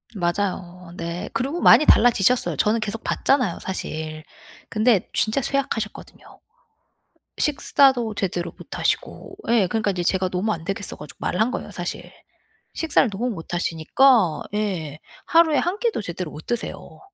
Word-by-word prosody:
맞아요. 180 -1 -3
네. 170 +1 -5
그리고 280 +8 -2
많이 305 - +7
달라지셨어요. 240 +1 +4
저는 220 +2 +2
계속 215 +2 -4
봤잖아요 250 -10 +1
사실. 155 -4 -5 0.5
근데 215 -2 +2
진짜 220 +5 +1
쇠약하셨거든요. 260 -6 -4 1.0
식사도 265 -6 +2
제대로 175 -4 -2
못하시고. 375 - -3
예. 225 -5 +4
그러니까 215 0 0
인제 175 -1 -3
제가 185 +1 +1
너무 185 +4 -1
안 165 -3 -6
되겠어 195 +1 -4
가지고 150 - -11
말을 180 - -2
한 230 +3 +3
거예요 - - -5
사실. - - -6 0.6
식사를 315 -6 +2
너무 235 +6 -2
못 175 -3 -6
하시니까. 175 - +3
예. 175 -8 -2 0.3
하루에 325 -3 +4
1 360 +4 -1
끼도 465 - -1
제대로 175 -3 -5
못 155 - -11
드세요. 240 -1 -5
210 Hz, 335 characters per minute, -23 LUFS, 175-250 Hz, 1.0 s, 많이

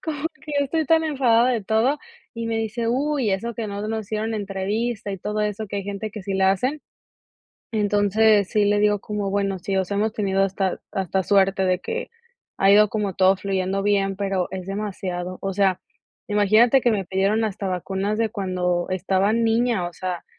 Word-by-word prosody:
como 305 -3 -3
que 300 - -10
ya 285 - +2
estoy 320 +3 0
tan 320 +2 +3
enfadada 255 -5 +3
de 230 -5 -1
todo. 225 +8 +2 0.4
Y 230 0 -4
me 225 0 -1
dice: 225 +1 -2
"Uy, 265 -1 0
eso 230 +4 -2
que 225 -1 -4
no 205 +1 -4
nos 220 0 -2
hicieron 220 +1 -2
entrevista, 205 +2 -2
y 195 - -3
todo 210 +3 -3
eso", 210 +1 -2
que 200 - -5
hay 200 - -2
gente 200 +1 -4
que 210 -1 -8
sí 195 +1 -3
la 190 0 +4
hacen. 255 +10 -1 0.9
Entonces, 205 -1 +3
sí 210 -1 +2
le 205 0 +2
digo, 210 0 +3
como: 205 -2 -3
"Bueno, 195 -1 -1
sí. 195 +2 -3
O 190 - +2
sea, 200 +2 -3
hemos 215 +1 0
tenido 195 -2 +1
hasta 195 -1 -1
hasta 190 0 -1
suerte, 195 0 +3
de 185 0 +1
que 470 +1 -4 0.5
ha 195 - +4
ido 210 +1 +6
como 205 -2 -2
todo 190 0 +4
fluyendo 195 0 -1
bien, 195 -1 +1
pero 195 -2 -1
es 185 -1 -5
demasiado". 185 -3 -4
O 195 - -2
sea, 190 -1 +1 0.5
imagínate 215 +6 +4
que 240 - +3
me 200 -4 0
pidieron 195 +4 +1
hasta 200 -2 -3
vacunas, 190 +3 -2
de 225 - +1
cuando 180 -4 -1
estaba 190 +2 +1
niña. 230 -3 +1
O 175 - -14
sea, 180 -2 -4
205 Hz, 195 wpm, -23 LUFS, 190-225 Hz, 0.9 s, ido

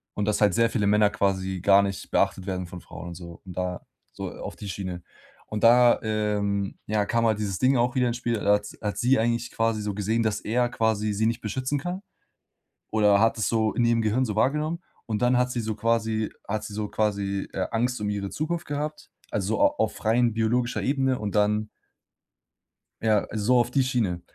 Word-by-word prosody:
und 105 - -1
dass 105 0 0
halt 105 -3 +4
sehr 115 0 +3
viele 105 -4 0
Männer 105 0 +4
quasi 95 -2 -1
gar 100 +1 +6
nicht 100 -1 -4
beachtet 95 0 0
werden 95 -1 -2
von 90 0 -9
Frauen 85 +1 -9
und - - -7
so 85 -1 -10
und 90 - -8
da 90 -1 -3 0.3
so - - -6
auf - - -7
die 105 - -8
Schiene. 90 -2 -5 0.4
Und 105 -1 -4
da, 120 +1 +6
ähm, 105 -2 -1
ja, 105 -1 +1
kam 115 +2 +1
halt 110 -2 +2
dieses 100 -3 -3
Ding 130 +1 +3
auch 120 +1 +1
wieder 125 -1 +2
ins 120 0 -1
Spiel. 120 -1 -2
Da 105 0 +3
hat 105 - -1
s 105 - -10
hat 105 -1 -3
sie 125 +1 +3
eigentlich 115 +1 0
quasi 115 -1 0
so 105 -1 -2
gesehen, 110 +3 0
dass 105 -1 0
er 120 +2 +1
quasi 110 -3 0
sie 110 +2 +1
nicht 115 - -1
beschützen 130 +6 -2
kann 180 +5 -4 0.9
oder 105 -2 +4
hat 115 +1 +3
es 110 - 0
so 110 -1 +1
in 120 - +2
ihrem 115 -1 +3
Gehirn 110 +4 +1
so 105 -4 -3
wahrgenommen 150 +8 +1 0.3
und 110 -1 -3
dann 125 0 +3
hat 125 0 +1
sie 120 - -2
so 110 -1 -3
quasi 110 0 0 0.2
hat 110 +1 -2
sie 105 - -7
so 105 0 -3
quasi, 100 -2 -1
äh, - - -1
Angst 120 0 0
um 105 - -1
ihre 100 -1 -3
Zukunft 170 +3 -3
gehabt, 150 +1 -5 0.2
also 105 +2 -1
a - - +7
auf 110 - -1
rein 115 +1 +3
biologischer 120 +2 0
Ebene 135 -2 +1
und 105 -1 -4
dann 105 +1 +2 1.3
ja, 110 -2 +2
so 110 +4 +2
auf 120 0 +1
die 135 +1 +3
Schiene. 115 -9 -1
110 Hz, 215 wpm, -26 LUFS, 100-120 Hz, 1.3 s, a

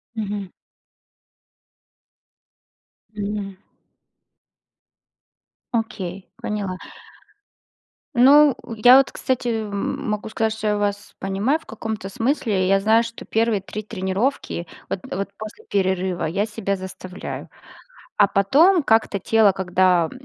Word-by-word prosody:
Мгм. 205 -3 -4 2.7
Мгм. 200 -1 -4 2.2
Окей, 195 -5 -4
поняла. 200 -3 -4 1.4
Ну, 280 +3 +7 0.2
я 245 +4 +8
вот, 270 - +3
кстати, 255 -1 -2
м 215 -3 -3
могу 210 +1 -3
сказать, 220 0 0
что 220 -1 -4
я 210 - +1
вас 205 0 -3
понимаю, 200 +10 0
в - - -22
каком-то 220 -3 -5
смысле, 220 -5 0
я 195 0 +4
знаю, 220 +3 +4
что 230 0 -8
первые 225 -2 +1
3 210 +2 -6
тренировки, 190 -2 -2 0.2
вот - - -3
вот 195 +1 -3
после 215 +1 -9
перерыва, 190 -3 0
я 195 +7 0
себя 210 -2 -2
заставляю. 185 -1 -7 0.7
А - - +6
потом 305 - +4
как-то 220 -5 +2
тело, 220 0 +4
когда, 180 -2 +2
205 Hz, 105 wpm, -22 LUFS, 195-225 Hz, 2.7 s, я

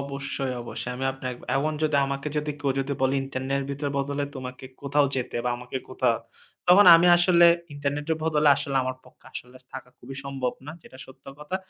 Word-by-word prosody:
অবশ্যই, 140 -1 -4
অবশ্যই 120 +1 -6
আমি 130 - -4
আপনার, 130 -1 -5 0.2
এখন 155 +3 0
যদি 155 -2 +2
আমাকে 140 +2 -3
যদি 150 0 -1
কেউ 140 -2 0
যদি 135 +1 -3
বলে 135 +1 +2
ইন্টারনেটের 140 +2 -3
বদলে 140 +1 -2
তোমাকে 130 0 -8 0.2
কোথাও 140 +1 +2
যেতে 125 -2 -3
বা 125 - 0
আমাকে 125 +2 -7
কোথাও, 125 -2 +1 0.5
তখন 190 +3 +7
আমি 170 +2 +3
আসলে 175 0 +5 0.3
ইন্টারনেটের 145 +2 -2
বদলে 155 -2 +2
আসলে 140 -1 -3
আমার 130 0 -3
পক্ষে 125 0 -21
আসলে 125 +1 -9 0.2
থাকা 130 -1 -8
খুবই 135 +2 -10
সম্ভব 135 -2 -3
না, 150 - -6
যেটা 130 - -15
সত্য 130 +1 -18
কথা। 150 +5 -4
140 Hz, 180 wpm, -25 LUFS, 130-150 Hz, 0.5 s, তখন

